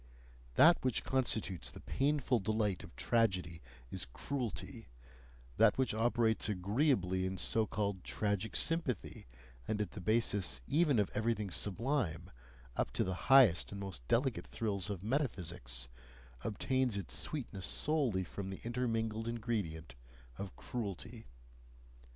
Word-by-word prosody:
That 165 +4 +6
which 130 -3 0
constitutes 110 -8 0
the - - -10
painful 135 -3 +1
delight 105 -2 0
of - - -12
tragedy 90 - +1 0.3
is - - -3
cruelty; 125 - -4 0.7
that - - +5
which 130 -5 +1
operates 115 0 +2
agreeably 100 - +1
in 95 0 -4
so 110 +4 +2
called 100 -3 -2
tragic 105 0 -2
sympathy, 165 - 0 0.4
and 110 - -1
at 105 - -2
the 100 - -8
basis 105 - +2
even 150 -3 +3
of 105 -2 +1
everything 110 -2 -1
sublime, 95 - -1 0.4
up - - 0
to - - +1
the 95 - -2 0.2
highest 125 -10 +6
and 100 - -6
most 95 -10 -6
delicate 120 - +1
thrills 100 -4 -2
of 100 -3 -4
metaphysics, 90 - -2 0.6
obtains 125 +1 0
its 95 - -2
sweetness 110 -11 -2
solely 135 -11 +1
from 95 +2 -6
the 95 - -6
intermingled 115 -2 -1
ingredient 105 - -3 0.4
of 100 +3 -7
cruelty. 115 0 -5
110 Hz, 125 wpm, -35 LUFS, 95-125 Hz, 0.7 s, That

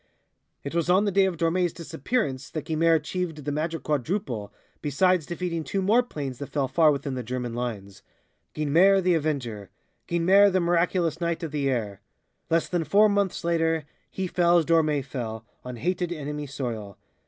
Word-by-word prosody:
It 140 - -5
was 170 0 0
on 190 +3 +4
the 205 - +1
day 195 +1 +4
of 185 -3 -2
Dormé's 170 +2 +1
disappearance 150 - -3
that 155 - -5
Guynemer 165 +1 +3
achieved 160 -1 -3
the 145 - -1
Magic 160 +3 -2
Quadruple, 145 - -2 0.3
besides 165 +3 +2
defeating 170 -1 -3
two 175 +7 -2
more 210 +6 +4
planes 140 - -6
that 140 - -6
fell 140 -3 0
far 155 +4 +4
within 140 -1 -3
the 130 - -3
German 125 0 -4
lines. 110 -6 -5 0.5
Guynemer 170 +7 +4
the 180 0 +3
avenger! 130 - -2 0.4
Guynemer 190 +4 +5
the 185 - +2
miraculous 170 -1 +1
knight 170 0 -1
of 160 - -4
the 145 -2 0
air! 105 -6 -2 0.5
Less 165 0 +2
than 175 -2 -1
four 210 +6 +4
months 200 -2 0
later 165 -2 +1 0.2
he 190 - -3
fell 175 -1 +3
as 165 - +2
Dormé 155 -4 +2
fell, 115 -5 -5 0.2
on 125 0 -6
hated 175 +7 -2
enemy 150 -2 -4
soil. 115 -7 -5
160 Hz, 175 wpm, -26 LUFS, 135-175 Hz, 0.5 s, Guynemer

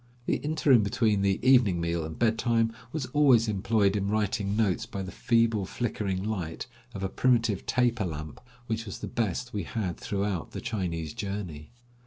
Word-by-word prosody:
The - - +1
interim 145 -5 +3
between 105 -1 +1
the 100 0 +2
evening 120 -9 +5
meal 85 0 -1
and 80 0 -6
bedtime 115 0 +2 0.2
was 155 -4 -2
always 130 -6 +5
employed 105 0 +2
in 100 -1 0
writing 105 -1 0
notes 105 -5 +1
by 95 - -5
the 95 - -6
feeble, 115 -3 +2
flickering 100 -5 -2
light 95 -7 -3 0.3
of 95 - -4
a - - +1
primitive 115 -2 +1
taper 120 -4 +2
lamp, 75 -4 -6 0.2
which 115 -1 -3
was 100 - -5
the - - -6
best 115 +2 -2
we 105 - -1
had 95 -1 -3
throughout 100 -4 -3
the - - -4
Chinese 85 -7 -3
journey. 100 -8 -5
105 Hz, 170 wpm, -28 LUFS, 95-115 Hz, 0.3 s, evening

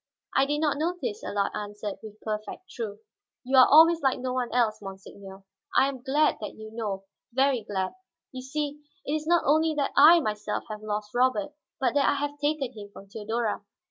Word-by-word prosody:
"I 270 0 +4
did 295 +1 -1
not 295 -2 +1
notice," 315 -10 -2
Allard 200 -1 -1
answered, 205 0 -5
with 215 -1 -11
perfect 215 - -5
truth. 215 -3 -6 0.4
"You 265 +2 0
are 255 - +9
always 325 +2 +7
like 270 -2 +2
no 255 0 -3
one 250 -2 -2
else, 230 -4 +1
monseigneur. 195 0 -10 0.3
I 270 - +6
am 265 -3 -7
glad 295 +4 +2
that 210 - -6
you 220 0 -10
know, 205 -4 -3 0.3
very 265 -1 +2
glad. 195 -3 -3 0.4
You 255 - -7
see, 290 +2 -4 0.2
it 290 - -2
is 310 0 -2
not 345 0 +4
only 315 +2 +3
that 285 -2 0
I 320 +5 +8
myself 210 -6 -3
have 215 0 -6
lost 210 -1 -4
Robert, 260 +5 +1 0.3
but 265 - +1
that 285 -1 +3
I - - +2
have 290 +1 -3
taken 290 -3 -1
him 205 -3 -10
from 200 -1 -13
Theodora. 220 +1 -2
250 Hz, 195 wpm, -27 LUFS, 210-290 Hz, 0.4 s, are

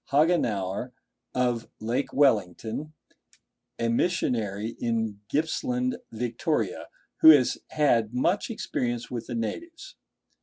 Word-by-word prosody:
Hagenauer, 125 - +1 0.4
of 125 -2 0
Lake 120 +5 -1
Wellington, 115 - +1 0.8
a 115 - 0
missionary 115 - 0
in 110 -3 -1
Gippsland, 250 - 0
Victoria, 115 - -2 0.3
who 160 - +8
has 145 -5 +6
had 120 -8 +2
much 170 - +1
experience 120 - -3
with 120 -2 -4
the 120 - -4
natives. 330 - -5
125 Hz, 100 wpm, -27 LUFS, 115-155 Hz, 0.8 s, who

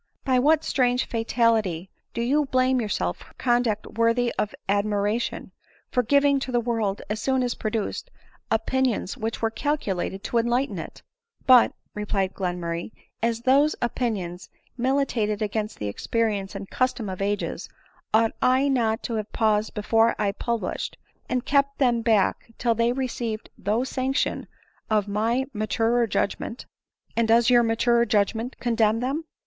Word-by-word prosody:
By 260 -2 +3
what 310 +4 +4
strange 250 -1 +1
fatality 225 -6 0 0.2
do 235 - -1
you 290 +5 +2
blame 255 -1 +2
yourself 90 - -1
for - - -17
conduct 240 -4 +1
worthy 230 +1 +2
of 210 - -2
admiration? 205 +3 0 0.4
for 250 - +3
giving 280 +3 +3
to 265 - -4
the 240 - +2
world, 225 -4 -1
as 215 +1 -3
soon 265 0 +1
as 245 -1 0
produced, 220 - -3 0.4
opinions 230 -2 0
which 225 +1 -4
were 225 - +2
calculated 205 -8 -2
to 235 - +1
enlighten 240 +4 0
it?" - - -9 0.2
" 465 0 -39
But," 255 -2 +7 0.2
replied 200 -2 -1
Glenmurray, 175 -2 -3 0.2
" - - -49
as 230 0 -4
those 280 +5 +4
opinions 205 -8 -3 0.3
mili 265 +3 +1
tated 215 -5 -1
against 215 +1 -3
the 105 - -4
experience 205 - -1
and 195 - -6
custom 255 -3 -1
of 190 0 -5
ages, 205 +1 -2 0.4
ought 225 +1 +4
I 260 +2 +3
not 230 -3 +1
to 235 - -3
have 215 0 -4
paused 215 -1 +1
before 225 +2 +3
I 200 - +1
published, 235 +2 -3 0.3
and 250 0 -1
kept 280 0 +2
them 240 -4 +2
back 225 0 +1
till 235 -1 +2
they 230 +1 +1
had 245 +2 0
received 235 -4 -3
the 220 +5 0
sanction 265 +1 -1 0.4
of 210 -2 +2
my 225 +6 0
maturer 225 +2 +1
judgment 225 +3 -2 0.2
?" - - -66
" - - -39
And 230 -1 +2
does 235 +2 +4
your 240 -1 +7
maturer 235 +1 +2
judgment 225 +4 0
condemn 225 -2 +2
them 275 +6 -2
230 Hz, 160 wpm, -25 LUFS, 210-250 Hz, 0.4 s, But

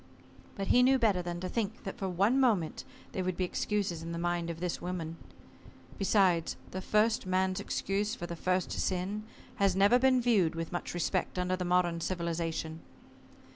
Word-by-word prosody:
But 195 -1 -4
he 250 - +6
knew 265 +1 +5
better 210 -7 +2
than 175 0 -4
to 185 - -2
think 220 +2 -3
that - - -6
for 195 -2 -2
one 200 +9 +2
moment 210 -12 +1 0.3
they 190 - -2
would 185 -1 -2
be 185 - 0
excuses 185 -2 -1
in 165 +1 -5
the - - -3
mind 175 0 -1
of 165 -1 -5
this 180 -1 -3
woman. 170 -2 -4 0.8
Besides, 190 -4 +3 0.2
the 185 - -4
first 215 +1 +2
man's 185 0 +1
excuse 205 +4 -1
for 175 - -6
the 170 0 -5
first 185 +2 0
sin 195 +3 -2 0.3
has 195 -2 +3
never 200 +6 +5
been 260 0 +4
viewed 210 -10 +2
with 165 0 -4
much 175 0 -4
respect 180 +2 -1
under 180 0 +1
the 180 -1 -3
modern 175 -1 +2
civilization. 165 -2 -2
185 Hz, 180 wpm, -31 LUFS, 175-205 Hz, 0.8 s, he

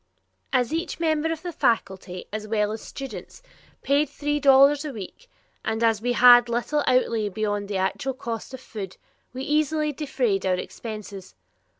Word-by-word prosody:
As 255 +1 +1
each 330 +1 -3
member 320 -1 +1
of 325 0 -5
the 355 - -4
faculty, 190 - -1
as 215 0 -4
well 210 -1 0
as 220 - -4
the - - -11
students, 275 - -8 0.4
paid 280 +1 +2
three 295 +1 -2
dollars 280 +1 +6
a 300 - -4
week, 225 - -10 0.3
and 220 +1 -1
as 225 -2 +3
we 245 +1 0
had 245 0 +7
little 245 +5 0
outlay 230 -4 +2
beyond 205 0 -2
the 200 -1 -2
actual 190 +8 -1
cost 235 -3 -5
of 260 - -12
food, 200 -7 -8 0.3
we 260 +1 -6
easily 300 +1 +1
defrayed 255 -9 -1
our 185 -1 +2
expenses. 205 - -8
245 Hz, 170 wpm, -25 LUFS, 215-290 Hz, 0.4 s, had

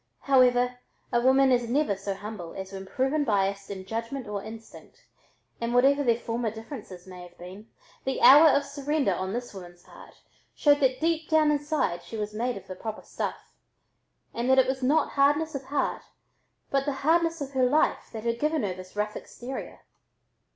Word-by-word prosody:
However, 250 -2 +3 0.3
a 240 - +3
woman 265 +1 +4
is 240 -2 +1
never 275 -5 +1
so 195 0 -4
humble 195 -4 -8
as 190 0 -7
when 190 0 -7
proven 270 +7 0
biased 200 -4 0
in 190 -2 -7
judgment 230 +4 -4
or 205 -1 -4
instinct, 220 +2 -12 0.6
and 235 +1 -1
whatever 280 +3 +4
their 235 -3 +3
former 235 -1 -2
differences 220 -5 -9
may 185 -1 -11
have 175 0 -13
been, 190 +5 -11 0.3
the 265 - -2
hour 300 +4 +9
of 280 0 +2
surrender 280 -4 -1
on 185 +1 -3
this 240 +1 -5
woman's 175 -2 -11
part - - -15 0.4
showed 290 -1 +4
that 260 -2 +2
deep 325 0 0
down 310 -2 +4
inside 290 - -1
she 225 - -8
was 210 0 -4
made 240 +2 -2
of 195 - -11
the 190 - -7
proper 215 +3 -6
stuff, - - -6 0.8
and 240 +2 -2
that 265 - +5
it 260 - +6
was 265 +1 -2
not 290 +4 +2
hardness 290 +3 +2
of 275 -2 -5
heart 285 +1 -1 0.7
but 275 0 +1
the 285 - -1
hardness 330 +1 +2
of 280 -2 -5
her 260 -2 +2
life 300 +4 +1
that 220 -2 -7
had 235 0 -1
given 305 -3 0
her 195 -3 -1
this 185 +1 -12
rough 210 0 -2
exterior. 255 +2 -8
245 Hz, 185 wpm, -27 LUFS, 205-280 Hz, 0.8 s, hour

